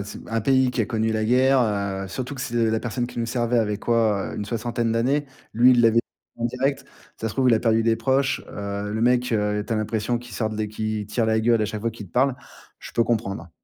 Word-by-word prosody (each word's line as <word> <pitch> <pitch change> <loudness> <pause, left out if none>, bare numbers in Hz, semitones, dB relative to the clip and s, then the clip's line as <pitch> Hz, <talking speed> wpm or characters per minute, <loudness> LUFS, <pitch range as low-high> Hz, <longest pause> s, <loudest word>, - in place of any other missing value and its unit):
s 105 - -8
un 115 - 0
pays 130 +2 +3
qui 125 - -2
a 105 - +1
connu 110 -2 0
la 110 0 0
guerre, 130 +4 +4
heu 100 -4 -1
surtout 130 +7 -5
que 135 - -7
c'est 115 -3 0
la 110 0 0
personne 120 0 -2
qui 120 - -9
nous 115 - -1
servait 120 0 0
avait 105 -2 0
quoi? 110 -3 +1
Heu, - - -7
une 105 - -4
soixantaine 115 0 -2
d'années. 130 +6 +1 0.3
Lui, 125 +3 +6
il 120 -1 +4
l'a 115 - +6
vé 115 +1 +3 0.4
en 120 - 0
direct. 130 +3 -2 0.3
Ça 115 - -1
se - - -7
trouve, 130 -2 +3
il - - +6
a 110 - +1
perdu 115 -1 +2
des 115 0 +3
proches. 135 +3 +1
Heu, 100 0 -4
le 110 +2 -2
mec, 125 +1 +2
heu, 105 -1 0
tu - - -15
as 115 - +1
l'impression 110 +2 -1
qu'il 120 0 -9
sort 110 - -1
de 110 - -6
l'é 110 0 -1
qu'il 110 0 -3
tire 115 +2 0
la 110 0 +2
gueule 115 0 +3
à 105 - +1
chaque 105 0 -5
fois 115 - 0
qu'il 110 -2 -10
te - - -22
parle. 130 +1 +2 0.4
Je - - -10
peux 115 - +2
comprendre. 100 -8 -2
115 Hz, 270 wpm, -24 LUFS, 110-120 Hz, 0.4 s, Lui